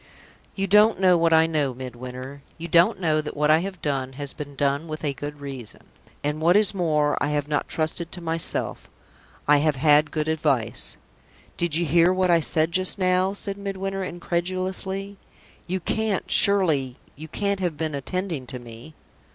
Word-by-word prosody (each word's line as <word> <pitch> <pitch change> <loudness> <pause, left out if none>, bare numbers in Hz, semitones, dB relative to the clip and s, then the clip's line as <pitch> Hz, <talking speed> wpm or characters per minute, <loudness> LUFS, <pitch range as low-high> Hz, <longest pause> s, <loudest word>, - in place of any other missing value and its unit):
"You 195 - -1
don't 210 +2 +4
know 185 -2 +5
what 165 -1 +2
I 160 0 +6
know, 150 -5 -1
Midwinter. 130 +2 -8 0.2
You 170 +1 -6
don't 170 +2 +4
know 155 -4 +1
that 150 -1 -7
what 150 +1 +3
I 155 - +5
have 185 -1 -6
done 135 -2 -2
has 140 0 -6
been 145 -1 -8
done 140 +3 0
with 155 0 -6
a 145 -2 0
good 145 +1 -7
reason. 135 -6 -8 0.4
And 150 +2 -2
what 175 +4 +5
is 210 -2 +3
more, 155 -5 +1
I - - +1
have 145 -1 -1
not 150 -1 -1
trusted 160 +1 -2
to - - -7
myself 165 -1 0 0.6
I 150 0 +6
have 150 0 +1
had 150 +2 +4
good 155 -1 -2
advice." 145 -8 +1 0.6
"Did 170 -3 0
you 170 +1 +2
hear 170 +3 +4
what 185 -1 +2
I 170 - +5
said 160 +1 +2
just 185 +3 +1
now?" 185 0 +2
asked 200 0 -2
Midwinter, 195 -1 -4
incredulously. 185 +3 -3 0.5
"You 185 +2 -2
can't 215 +2 -2
surely, 160 -11 +2 0.2
you 155 +3 -9
can't 200 +4 -2
have 175 -5 -2
been 155 0 -2
attending 160 -1 -4
to 125 - -6
me?" 120 +5 -12
160 Hz, 180 wpm, -24 LUFS, 145-185 Hz, 0.6 s, I